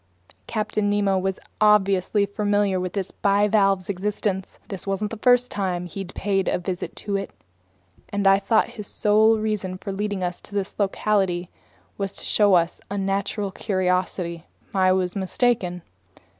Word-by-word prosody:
Captain 215 -1 -1
Nemo 200 -2 +2
was 190 0 -2 0.2
obviously 200 -1 +4
familiar 205 -1 +1
with 180 -1 -3
this 195 -2 -3
bivalve's 200 -2 +2
existence. 195 0 -2
This 195 -1 -6
wasn't 195 +2 -1
the 230 - -5
first 245 +2 +3
time 180 -3 -2
he'd 185 +1 -7
paid 195 -1 0
it - - +2
a - - +1
visit, 180 0 -4 1.1
and 200 0 -2
I 195 0 +6
thought 220 +3 +2
his 215 -4 -8
sole 215 +2 +3
reason 210 -4 -2
for 195 - -6
leading 200 -1 -2
us 175 0 -3
to 205 - -10
this 200 +1 -3
locality 190 -3 0 0.5
was 195 0 -2
to - - -7
show 205 -3 +4
us 170 0 +1
a 205 - -3
natural 200 +1 -1
curiosity. 180 -3 -1 0.3
I 185 -1 +4
was 185 0 0
mistaken. 190 -3 0
195 Hz, 150 wpm, -24 LUFS, 185-210 Hz, 1.1 s, I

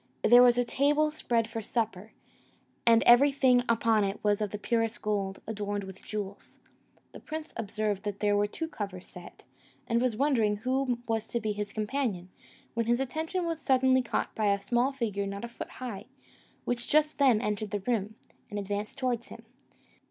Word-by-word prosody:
There 245 +2 +8
was 245 -1 +6
a 245 - +2
table 295 +5 +2
spread 235 -7 0
for 225 0 -5
supper, 220 -2 -3 0.8
and 230 0 +6
everything 260 0 +6
upon 225 -2 +3
it 195 +1 -2
was 205 0 +2
of 210 - 0
the 210 - -5
purest 225 +1 -1
gold, 200 -2 -2
adorned 205 -2 -3
with 190 -1 -10
jewels. 205 -2 -6 0.5
The - - -10
prince 315 +1 -7
observed 210 -2 -2
there 205 0 0
were 205 0 +2
two 325 +10 -4
covers 195 - -6
set, 180 -2 -13 0.4
and 235 0 +1
was 245 -4 0
wondering 235 -7 +2
who 255 +2 0
was 225 -1 -1
to 235 - -2
be 215 -1 -2
his 205 -1 -4
companion, 215 -5 -2 0.4
when 230 -1 -1
his 240 +1 +2
attention 320 +7 -2
was 330 -1 -3
suddenly 260 -1 +3
caught 245 - -2
by 215 -1 0
a 200 - +1
small 240 +6 +1
figure 210 -7 -2
not 200 +3 -5
a - - -5
foot 235 - -8
high, 245 -6 -7 0.6
which 245 0 -2
just 305 0 +2
then 260 -6 +5
entered 210 -2 -2
the 205 -1 -3
room, 220 -3 -1 0.3
and 205 - -5
advanced 205 +4 -4
towards 250 -3 -1
him. - - -12
225 Hz, 180 wpm, -29 LUFS, 205-255 Hz, 0.8 s, There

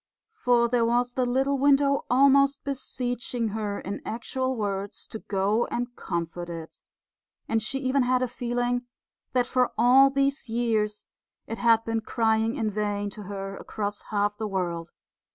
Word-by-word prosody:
For 245 - +2
there 235 0 +2
was 240 +1 +1
the 255 -1 0
little 270 +2 +1
window 280 0 +3
almost 275 +2 +4
beseeching 245 -3 -2
her 205 -1 -3
in 200 - -5
actual 260 +3 -2
words 200 -2 -3
to 220 - -8
go 205 +4 0
and 245 0 -3
comfort 170 0 -4
it; 165 -1 -8 0.7
and 225 0 +1
she 270 +6 -2
even 265 +1 +2
had 255 0 +2
a - - +1
feeling 245 0 -2 0.5
that 250 -1 +3
for 255 -1 +1
all 255 +4 +7
these 275 -1 0
years 220 -2 0 0.4
it 225 - -6
had 230 -1 +4
been 225 0 -1
crying 225 0 +1
in 215 -1 -1
vain 205 0 -2
to 210 - -9
her 195 0 -5
across 205 -1 -4
half 205 0 +1
the 220 0 -3
world. 175 -4 -3
235 Hz, 155 wpm, -26 LUFS, 205-255 Hz, 0.7 s, all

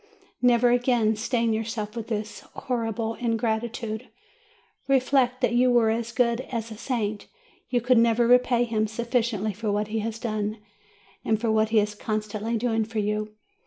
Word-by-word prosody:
Never 245 -1 +4
again 245 -3 +2
stain 230 +1 0
yourself 220 -1 -3
with 230 -2 -5
this 215 -1 -4 0.2
horrible 225 -2 -2
ingratitude! 230 -1 -2 0.8
Reflect, 260 -1 +2
that 245 -2 +2
were 240 -2 +4
you - - +1
as 235 0 -4
good 235 0 +1
as 230 -2 -3
a - - -6
saint, 215 -3 -3 0.4
you 245 -1 +1
could 245 0 +4
never 230 0 +3
repay 245 0 +4
him 220 -2 0
sufficiently 225 -2 -1
for 210 +2 -2
what 210 +1 -1
he 220 +1 -1
has 225 +1 -3
done 215 -2 -2 0.7
and 220 -1 +1
for 225 -1 0
what 220 0 +2
he 225 - +2
is 210 0 0
constantly 215 +1 -3
doing 225 -1 0
for 225 +1 -7
you. 210 0 -1
225 Hz, 160 wpm, -25 LUFS, 215-240 Hz, 0.8 s, Never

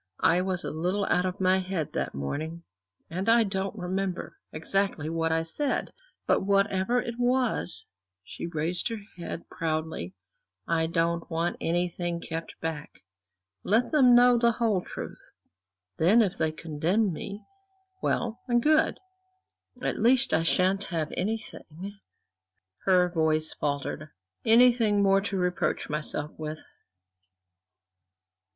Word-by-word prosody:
I 175 +2 +5
was 185 -1 -1
a - - -3
little 180 +6 -1
out 180 +1 +3
of 185 - -5
my 190 0 +3
head 185 -4 -3
that - - -2
morning, 155 - -4 0.4
and 185 +6 -2
I 230 0 +6
don't 195 0 -3
remember 185 0 -3
exactly 160 -1 -1
what 165 0 0
I 165 0 +1
said! 270 - -1 0.3
but - - +3
whatever 200 +3 +2
it 235 0 -5
was" 245 -5 0 0.4
she 140 - -7
raised 170 +4 -2
her 230 - -3 0.2
head 170 0 -6
proudly 160 +2 -3 0.5
"I 165 -1 +1
don't 165 0 0
want 165 +1 -1
anything 175 0 -1
kept 165 -1 -6
back. 160 -9 -5 0.6
Let 225 +5 +2
them 260 -6 +6
know 245 0 +6
the 235 0 +4
whole 225 -5 +1
truth; - - -8 0.7
then, 205 +8 +6
if 195 -2 -1
they 160 - +1
condemn 165 +6 0
me, 200 +6 -7 0.6
well 235 0 -1
and 240 -1 +3
good. 310 +1 +3 0.9
At - - -1
least 255 +4 +3
I 160 - +4
shan't 185 +4 +2
have 165 -3 -3
anything" 200 -2 -5 0.9
her 180 -2 +5
voice 160 -2 +1
faltered 145 +1 -3 0.4
"anything 225 -3 +5
more 195 0 +4
to 200 0 -3
reproach 180 -4 -1
myself 150 0 -2
with." 155 0 -5
185 Hz, 130 wpm, -28 LUFS, 165-210 Hz, 0.9 s, I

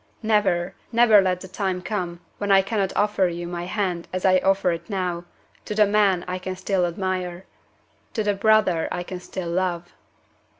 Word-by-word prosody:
Never, 205 -5 +1 0.2
never, 230 -3 +6
let 185 -1 0
the 190 - -8
time 185 -1 -3
come 180 -5 -4 0.2
when 205 -1 -1
I 195 0 +6
cannot 195 -1 -1
offer 205 -2 +2
you 175 0 -4
my 175 0 -5
hand 180 -3 -2
as 185 +1 -3
I 185 -1 +5
offer 190 -1 +2
it 170 +5 -5
now, 180 -3 -2 0.4
to 210 - -4
the 210 0 +5
man 200 -3 +2
I 185 0 -3
can 185 0 -5
still 185 -1 0
admire 180 0 -3 0.7
to 220 - 0
the 205 0 +1
brother 195 -5 +3
I 175 - -3
can 180 0 -7
still 180 -1 -6
love!" 175 -1 -2
185 Hz, 180 wpm, -23 LUFS, 175-205 Hz, 0.7 s, never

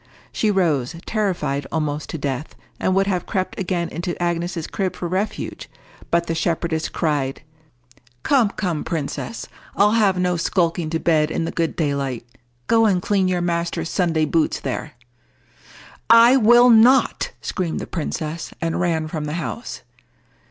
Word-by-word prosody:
She 215 - 0
rose, 165 -10 +1
terrified 160 -10 -1
almost 150 -2 -2
to - - -4
death, 140 0 -4 0.2
and 185 - +1
would 195 0 +3
have 185 -3 -2
crept 185 -3 -2
again 175 -2 -1
into 175 +2 -4
Agnes's 175 -1 -2
crib 190 -2 -3
for 175 - -4
refuge; 190 +5 -3 0.4
but 170 0 +2
the 165 - -2
shepherdess 165 -1 -1
cried— 145 -5 -1 0.8
"Come, 255 -7 +3
come, 175 -7 -3
princess! 165 +7 -4 0.3
I'll 205 +1 +4
have 210 -4 +3
no 180 -1 +1
skulking 170 -2 0
to 165 0 -1
bed 155 -2 +2
in 165 - -2
the - - -3
good 165 -1 -1
daylight. 140 -6 -2 0.4
Go 225 - +4
and 190 -3 +2
clean 195 0 +1
your 180 -1 0
master's 170 -1 -2
Sunday 165 -4 +1
boots 160 +1 +1
there." 150 - -4 1.2
"I 230 +3 +8
will 240 0 +6
not!" 240 +4 +5
screamed 175 -3 -3
the - - -5
princess, 160 -1 -4
and 165 +1 -1
ran 165 -3 0
from 155 -1 -4
the 150 - -4
house. 140 -10 -5
170 Hz, 150 wpm, -21 LUFS, 155-195 Hz, 1.2 s, I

